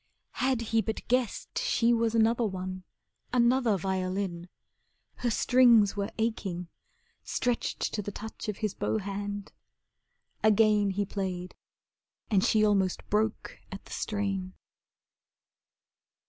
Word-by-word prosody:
Had 260 -2 +1
he 225 - +5
but 220 0 -4
guessed 250 -2 -1
she 240 - +2
was 230 -1 +1
another 230 +1 +3
one, 185 -1 -5 0.5
Another 240 -3 +3
violin. 185 -1 -2 0.7
Her 245 - 0
strings 235 -3 +5
were 200 -1 -2
aching, 195 -6 -2 0.5
Stretched 245 -2 -1
to 210 - -1
the 205 - -5
touch 220 +1 -7
of 205 - -3
his 210 - -2
bow - - -1
hand, 205 0 -5 0.9
again 215 -1 +4
He 200 +1 -1
played 185 -2 -4 0.8
and 195 -3 +4
she 215 -1 +4
almost 195 -3 +1
broke 215 +1 -1
at 195 - -8
the - - -15
strain. 195 -3 -2
210 Hz, 120 wpm, -29 LUFS, 190-225 Hz, 0.9 s, he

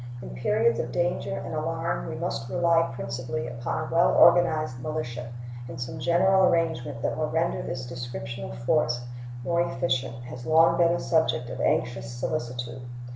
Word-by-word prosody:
In - - -8
periods 110 - +1
of 120 - -2
danger 175 +5 -1
and - - -5
alarm 155 - -2
we - - -4
must 120 +1 -3
rely 165 +4 +3
principally 120 0 -4
upon 120 +5 -3
a 160 - -5
well 170 - +4
organized 155 -7 +5
militia, 125 -6 -4 0.4
and 125 -1 -7
some 125 0 -5
general 190 +2 +4
arrangement 155 -7 -1
that - - 0
will 155 -1 -1
render 165 +1 0
this 125 0 -4
description 120 -1 -6
of 115 - -8
force 120 -1 +1 0.4
more 170 +5 +1
efficient 130 -5 -1
has 125 0 -8
long 165 +1 +5
been 170 -1 +5
a 175 - 0
subject 145 -7 +1
of - - -5
anxious 120 -1 0
solicitude. 125 -1 -4
125 Hz, 165 wpm, -27 LUFS, 120-165 Hz, 0.4 s, organized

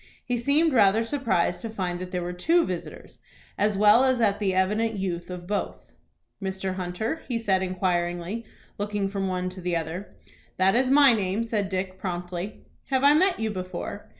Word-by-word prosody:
He 245 - -1
seemed 285 +6 +2
rather 215 -1 +4
surprised 225 -9 0
to 230 - -5
find 185 -5 -3
that 185 0 -6
there 180 -1 -3
were 175 +1 -4
two 330 - +2
visitors, 180 -2 -7 0.4
as 205 -1 +1
well 210 +4 +6
as 260 -2 +2
at 205 -3 +2
the 200 -3 +1
evident 210 +4 +1
youth 180 -3 -3
of 180 -1 -7
both. 205 +2 -4 0.5
"Mr. 190 0 -3
Hunter?" 185 - -3
he 240 - -1
said, 200 -5 +1
inquiringly, 180 +2 -1 0.4
looking 205 -1 -1
from 195 -1 -2
one 185 -1 -2
to 185 0 -9
the 175 -1 -1
other. 165 +4 -4 0.4
"That 190 +1 +4
is 255 +3 +3
my 275 -2 +7
name," 205 0 0
said 215 -4 -1
Dick, 185 0 -3
promptly. 180 +1 -5 0.2
"Have 265 -1 0
I 285 +1 +7
met 365 +4 +3
you 220 -1 -1
before? 185 -2 -6
195 Hz, 180 wpm, -26 LUFS, 185-230 Hz, 0.5 s, my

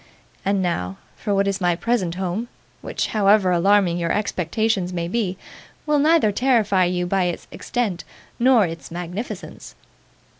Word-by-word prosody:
And 195 -1 +1
now, 95 - -2 0.2
for 210 - -4
what 200 0 +2
is 195 0 -1
my 175 -1 +2
present 185 -3 -1
home, 190 +5 -3 0.3
which, - - -2
however 200 -2 +3
alarming 180 0 +3
your 170 -1 -1
expectations 200 0 0
may 170 -2 -2
be, 190 -2 -1 0.5
will 300 -1 +2
neither 305 -7 +4
terrify 210 -5 +2
you 180 0 -1
by 185 +1 +1
its 175 -1 -4
extent 215 -8 -2 0.4
nor 240 -4 +5
its 165 -1 -7
magnificence! 180 +6 -7
195 Hz, 145 wpm, -22 LUFS, 175-220 Hz, 0.5 s, nor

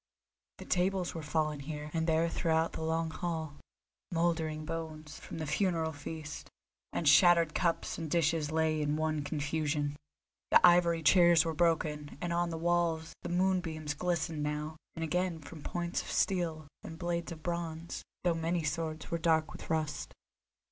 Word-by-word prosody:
The - - -9
tables 185 0 +1
were 165 - -5
fallen 155 -1 -1
here 150 +1 -6
and 165 0 0
there 160 +1 +3
throughout 165 -1 +1
the - - -5
long 160 0 0
hall; 160 -4 -4 0.5
mouldering 165 -2 0
bones, 155 -2 -6
from - - -8
the 160 - -3
funeral 165 +1 +1
feast, 150 0 -7 0.4
and 160 - -1
shattered 165 +1 +6
cups 170 -1 0
and 160 -1 -4
dishes 160 -2 +1
lay 160 -1 +1
in 150 0 +1
one 155 -1 0
confusion; 150 0 -1 0.5
the - - +7
ivory 170 -2 +5
chairs 170 +1 +6
were 165 - -1
broken, 155 -3 0
and 175 +1 -2
on 175 0 +1
the 165 - -3
walls 165 -1 0
the - - -5
moonbeams 175 -4 0
glistened 170 -1 -1
now 150 +1 -2 0.2
and 165 - -3
again 180 +1 0
from 155 +1 -10
points 175 +3 -2
of - - -9
steel 165 -5 0 0.2
and 160 - -8
blades 170 0 -2
of 155 -2 -8
bronze, 170 -1 -4 0.2
though 175 -1 +3
many 165 +1 -1
swords 155 +1 -3
were 170 - 0
dark 160 -1 +2
with - - -10
rust. 155 -2 -2
160 Hz, 160 wpm, -32 LUFS, 155-170 Hz, 0.5 s, the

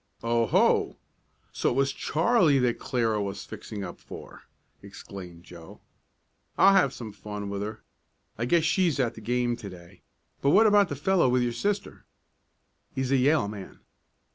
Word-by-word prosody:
"Oh, 115 0 +1
ho! - - +2 0.6
So - - 0
it - - -2
was 135 0 +1
Charlie 165 - +2
that 125 -2 +1
Clara 115 -4 0
was 100 0 -5
fixing 105 -3 -7
up 90 - -8
for!" - - -12 0.4
exclaimed 95 -3 -11
Joe. 85 -2 -13 0.8
"I'll 195 +1 +6
have 185 -9 +4
some 115 -5 -8
fun 105 0 -7
with 100 0 -3
her. 110 +1 -6 0.5
I 115 - -2
guess 165 +5 +3
she's 165 -2 +1
at 120 -3 +1
the 110 - -11
game 120 +1 0
to 105 -4 -8
day. 90 0 -14 0.4
But 140 - +2
what 220 - +6
about 205 -2 +5
the 145 - -3
fellow 170 +1 +2
with 125 0 +2
your 120 -1 -1
sister?" 200 - -3 0.9
"He's 130 0 -2
a 135 - +4
Yale 140 -3 +3
man." 100 -2 -9
120 Hz, 165 wpm, -27 LUFS, 100-145 Hz, 0.9 s, I'll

